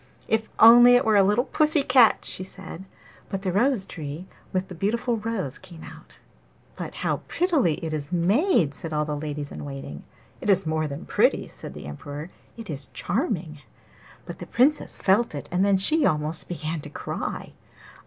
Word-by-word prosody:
'If 220 Hz, 0 st, 0 dB
only 240 Hz, +2 st, +9 dB
it 245 Hz, -, +3 dB
were 220 Hz, -1 st, +3 dB
a 200 Hz, -, +7 dB
little 210 Hz, +5 st, +3 dB
pussy 305 Hz, +1 st, +2 dB
cat!' 255 Hz, -4 st, +5 dB
she 185 Hz, -, -7 dB
said. 190 Hz, -1 st, -10 dB, 0.4 s
But 195 Hz, 0 st, -4 dB
the 185 Hz, -, 0 dB
rose 235 Hz, 0 st, +2 dB
tree 155 Hz, +2 st, -7 dB, 0.3 s
with 185 Hz, 0 st, -1 dB
the -, -, -9 dB
beautiful 230 Hz, +6 st, -1 dB
rose 205 Hz, -, -4 dB
came 175 Hz, -4 st, -13 dB
out. -, -, -13 dB, 0.6 s
'But -, -, -7 dB
how -, -, +1 dB
prettily 315 Hz, -, +1 dB
it 160 Hz, -, -3 dB
is 150 Hz, 0 st, -4 dB
made!' 180 Hz, -, +2 dB
said 160 Hz, +2 st, -6 dB
all 150 Hz, 0 st, 0 dB
the 150 Hz, 0 st, -3 dB
ladies 145 Hz, -1 st, -5 dB
in -, -, -7 dB
waiting. 135 Hz, -, -8 dB, 0.4 s
'It -, -, -4 dB
is 190 Hz, -2 st, +4 dB
more 155 Hz, 0 st, -1 dB
than 140 Hz, +1 st, -7 dB
pretty,' -, -, +1 dB
said -, -, -9 dB
the -, -, -9 dB
Emperor, 145 Hz, -, -8 dB, 0.3 s
'it 230 Hz, -2 st, -8 dB
is 140 Hz, -4 st, -3 dB
charming!' 175 Hz, -, -2 dB, 0.7 s
But -, -, -8 dB
the -, -, -8 dB
Princess 285 Hz, +5 st, +2 dB
felt 205 Hz, -1 st, +2 dB
it, 145 Hz, -, -6 dB
and 180 Hz, +2 st, +2 dB
then 200 Hz, -1 st, +3 dB
she 305 Hz, +11 st, +3 dB
almost 155 Hz, -, 0 dB
began 160 Hz, -2 st, -4 dB
to -, -, -9 dB
cry. -, -, -5 dB
185 Hz, 185 wpm, -25 LUFS, 155-230 Hz, 0.7 s, only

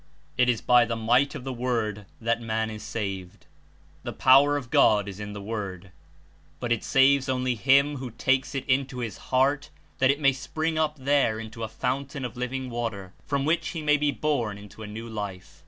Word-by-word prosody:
It 125 Hz, 0 st, +3 dB
is 120 Hz, -3 st, +1 dB
by 125 Hz, -1 st, +5 dB
the 115 Hz, -1 st, -2 dB
might 120 Hz, +5 st, +2 dB
of -, -, -6 dB
the 135 Hz, 0 st, -4 dB
Word 115 Hz, -5 st, -2 dB
that 115 Hz, 0 st, 0 dB
man 110 Hz, -1 st, -1 dB
Is 105 Hz, 0 st, -7 dB
saved. 95 Hz, -6 st, -5 dB, 0.6 s
The -, -, -5 dB
power 140 Hz, +3 st, +5 dB
of 125 Hz, -5 st, -7 dB
God 105 Hz, -2 st, +4 dB
Is 100 Hz, 0 st, -7 dB
In 105 Hz, 0 st, -6 dB
the 105 Hz, -, -7 dB
Word, 100 Hz, -4 st, -5 dB, 0.7 s
but 120 Hz, -, -3 dB
It 120 Hz, -, +1 dB
saves 135 Hz, 0 st, +4 dB
only 130 Hz, -1 st, 0 dB
him 140 Hz, +5 st, +3 dB
who 130 Hz, -1 st, -5 dB
takes 130 Hz, +4 st, 0 dB
It 135 Hz, -, -3 dB
Into 135 Hz, 0 st, +1 dB
his 115 Hz, -5 st, -4 dB
heart 135 Hz, +3 st, +2 dB, 0.3 s
that 130 Hz, -1 st, +4 dB
It 140 Hz, +1 st, +2 dB
may 140 Hz, -2 st, +4 dB
spring 155 Hz, +4 st, -3 dB
up 155 Hz, -1 st, 0 dB
there 135 Hz, -5 st, +2 dB
Into 115 Hz, +1 st, -8 dB
a 110 Hz, -, -2 dB
fountain 135 Hz, +4 st, -3 dB
of 125 Hz, -, -6 dB
living 125 Hz, +1 st, -4 dB
Water, 110 Hz, -6 st, -4 dB
from 140 Hz, -1 st, 0 dB
which 160 Hz, +3 st, +1 dB
he 160 Hz, -3 st, -5 dB
shall 150 Hz, 0 st, +4 dB
be 150 Hz, 0 st, +2 dB
born 135 Hz, -9 st, -1 dB
Into 105 Hz, +1 st, -13 dB
a 110 Hz, -, -6 dB
new 110 Hz, +2 st, -7 dB
Life. 100 Hz, -4 st, -7 dB
125 Hz, 205 wpm, -26 LUFS, 110-140 Hz, 0.7 s, by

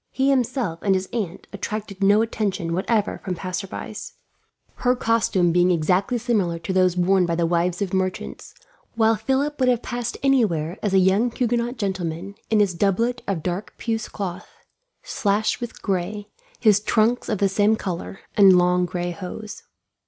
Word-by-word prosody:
He 270 Hz, +1 st, +1 dB
himself 245 Hz, -, 0 dB
and 195 Hz, -2 st, +2 dB
his 185 Hz, 0 st, -2 dB
aunt 195 Hz, -6 st, -3 dB
attracted 205 Hz, 0 st, -5 dB
no 205 Hz, +3 st, +5 dB
attention, 200 Hz, -6 st, -2 dB
whatever, 205 Hz, +4 st, 0 dB
from 185 Hz, -2 st, -3 dB
passersby; 185 Hz, +4 st, -5 dB, 0.8 s
her 250 Hz, 0 st, +2 dB
costume 225 Hz, -7 st, +2 dB
being 175 Hz, +1 st, +3 dB
exactly 180 Hz, +7 st, +1 dB
similar 215 Hz, -8 st, 0 dB
to 165 Hz, +3 st, -4 dB
those 185 Hz, -1 st, +3 dB
worn 180 Hz, 0 st, +3 dB
by 170 Hz, -, 0 dB
the 170 Hz, 0 st, +1 dB
wives 175 Hz, +2 st, 0 dB
of 195 Hz, -, -5 dB
merchants, 185 Hz, -1 st, -3 dB, 0.4 s
while 225 Hz, 0 st, +4 dB
Philip 270 Hz, +7 st, -1 dB
would 255 Hz, -1 st, +3 dB
have 245 Hz, -2 st, +1 dB
passed 240 Hz, -1 st, -4 dB
anywhere 200 Hz, -, +1 dB
as 200 Hz, -2 st, 0 dB
a -, -, +6 dB
young 190 Hz, +6 st, +3 dB
Huguenot 240 Hz, +1 st, -1 dB
gentleman, 190 Hz, -2 st, -3 dB, 0.2 s
in 215 Hz, -1 st, +4 dB
his 200 Hz, -3 st, +2 dB
doublet 220 Hz, +7 st, 0 dB
of 180 Hz, -6 st, -2 dB
dark 180 Hz, +4 st, -4 dB
puce 225 Hz, -2 st, -3 dB
cloth, 190 Hz, -3 st, -5 dB, 0.5 s
slashed 210 Hz, +3 st, 0 dB
with 240 Hz, -, -7 dB
gray, 200 Hz, +1 st, -2 dB, 0.3 s
his 210 Hz, -3 st, +5 dB
trunks 220 Hz, +3 st, +1 dB
of 215 Hz, -, 0 dB
the 200 Hz, -, +2 dB
same 205 Hz, +3 st, +3 dB
colour, 190 Hz, -2 st, -5 dB
and 195 Hz, -3 st, +7 dB
long 180 Hz, 0 st, +3 dB
gray 175 Hz, 0 st, -3 dB
hose. 205 Hz, +4 st, -7 dB
200 Hz, 165 wpm, -23 LUFS, 180-225 Hz, 0.8 s, and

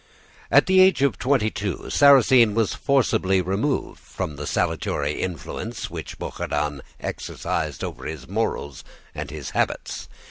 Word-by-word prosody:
"At -, -, +6 dB
the 190 Hz, 0 st, +4 dB
age 185 Hz, -6 st, +5 dB
of 140 Hz, -, +1 dB
twenty 125 Hz, -5 st, +2 dB
two 100 Hz, -3 st, -4 dB
Sarrasine 130 Hz, -6 st, +6 dB
was 115 Hz, -3 st, +1 dB
forcibly 110 Hz, -8 st, +2 dB
removed 95 Hz, -, -1 dB
from 75 Hz, -, -5 dB
the 75 Hz, 0 st, -6 dB
salutary 75 Hz, +1 st, -1 dB
influence 90 Hz, -4 st, -5 dB
which -, -, -7 dB
Bouchardon 75 Hz, -1 st, -3 dB, 0.2 s
exercised -, -, -4 dB
over -, -, -6 dB
his 75 Hz, -5 st, -7 dB
morals 70 Hz, -1 st, -3 dB, 0.3 s
and 75 Hz, -2 st, -5 dB
his 75 Hz, -2 st, -7 dB
habits. -, -, -2 dB
95 Hz, 135 wpm, -23 LUFS, -, 0.3 s, At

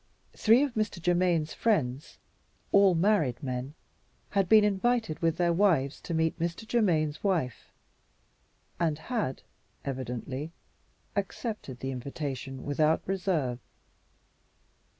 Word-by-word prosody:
Three 230 Hz, +5 st, +5 dB
of 280 Hz, -4 st, -2 dB
Mr. 215 Hz, -4 st, -1 dB
Germaine's 175 Hz, -2 st, +1 dB
friends, 145 Hz, -, 0 dB, 0.5 s
all 195 Hz, -2 st, +6 dB
married 165 Hz, -, +2 dB
men, 130 Hz, +2 st, -4 dB, 0.6 s
had 195 Hz, -3 st, +1 dB
been 220 Hz, -1 st, +7 dB
invited 210 Hz, -3 st, +1 dB
with 165 Hz, -1 st, +1 dB
their 175 Hz, -1 st, +2 dB
wives 165 Hz, -8 st, +2 dB
to 170 Hz, -, -4 dB
meet 160 Hz, 0 st, 0 dB
Mr. 170 Hz, +6 st, -3 dB
Germaine's 165 Hz, -11 st, +1 dB
wife, 165 Hz, -, -1 dB, 1.1 s
and 160 Hz, -3 st, +1 dB
had 210 Hz, -, -3 dB, 0.4 s
(evidently) 130 Hz, +3 st, -4 dB, 0.6 s
accepted 200 Hz, -, -4 dB
the 135 Hz, -, -2 dB
invitation 135 Hz, 0 st, -5 dB
without 155 Hz, +3 st, +2 dB
reserve. 180 Hz, -10 st, -1 dB
165 Hz, 110 wpm, -29 LUFS, 135-200 Hz, 1.1 s, been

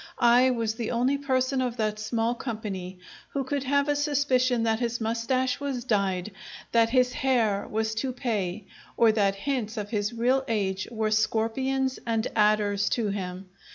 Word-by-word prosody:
I 245 Hz, +1 st, +5 dB
was 230 Hz, -3 st, 0 dB
the 230 Hz, -1 st, -4 dB
only 255 Hz, +4 st, +1 dB
person 260 Hz, -1 st, 0 dB
of 250 Hz, -2 st, -2 dB
that 215 Hz, -1 st, -1 dB
small 225 Hz, +2 st, 0 dB
company 205 Hz, -7 st, -5 dB, 0.3 s
who 275 Hz, -, -2 dB
could 275 Hz, +1 st, -2 dB
have 280 Hz, +2 st, +2 dB
a 290 Hz, -, +2 dB
suspicion 270 Hz, -5 st, +1 dB
that 225 Hz, -1 st, +1 dB
his 240 Hz, -1 st, -1 dB
moustache 240 Hz, +3 st, 0 dB
was 275 Hz, -4 st, -3 dB
dyed, 200 Hz, -4 st, 0 dB, 0.4 s
that 230 Hz, -1 st, +4 dB
his 250 Hz, 0 st, +2 dB
hair 240 Hz, -8 st, +1 dB
was 220 Hz, +1 st, -1 dB
toupee, 220 Hz, -6 st, -2 dB, 0.3 s
or 230 Hz, -1 st, +6 dB
that 200 Hz, -2 st, +1 dB
hints 225 Hz, 0 st, -3 dB
of 205 Hz, -1 st, -4 dB
his 210 Hz, -1 st, -1 dB
real 250 Hz, +3 st, +1 dB
age 195 Hz, -4 st, -1 dB
were 220 Hz, -2 st, -1 dB
scorpions 255 Hz, +5 st, 0 dB
and 225 Hz, -1 st, 0 dB
adders 210 Hz, -1 st, +2 dB
to 225 Hz, -4 st, 0 dB
him. 190 Hz, -1 st, -5 dB
230 Hz, 160 wpm, -27 LUFS, 215-255 Hz, 0.4 s, or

